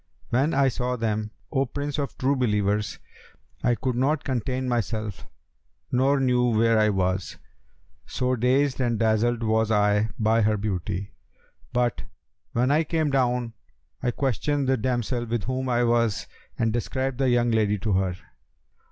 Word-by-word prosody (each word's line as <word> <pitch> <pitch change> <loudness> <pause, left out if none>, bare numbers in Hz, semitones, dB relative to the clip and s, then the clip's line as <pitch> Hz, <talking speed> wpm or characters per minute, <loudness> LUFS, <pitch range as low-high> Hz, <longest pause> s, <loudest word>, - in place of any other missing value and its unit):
When 135 +6 +1
I 135 0 +4
saw 125 0 -2
them, 110 -2 -1 0.2
O 135 -2 +1
Prince 145 +3 -3
of 140 - -4
True 135 +2 +1
Believers, 105 -4 0 0.7
I 120 -1 +3
could 125 +2 -2
not 140 +4 +1
contain 130 0 -2
myself 110 -6 -2 0.6
nor 135 +3 +3
knew 125 -2 +2
where 115 0 +3
I 105 0 +4
was, 95 -1 -1 0.7
so 130 0 0
dazed 130 +3 +2
and 120 -2 +1
dazzled 115 +2 +1
was 110 0 +2
I 105 0 +2
by 110 +1 +2
her 105 0 +2
beauty: 100 -1 -3 0.6
but, 120 -1 0 0.5
when 125 +3 +2
I 155 +3 +3
came 155 -2 0
down, 125 -3 +1 0.5
I 125 - 0
questioned 135 +2 -1
the 135 - +3
damsel 120 0 -1
with 115 -2 -2
whom 130 +2 -2
I 120 0 +2
was 115 -3 +1 0.3
and 115 -1 +1
described 130 +2 -2
the 135 -2 +2
young 120 -1 +2
lady 105 -2 +2
to 105 +2 -2
her. 95 -1 +1
120 Hz, 150 wpm, -25 LUFS, 110-130 Hz, 0.7 s, I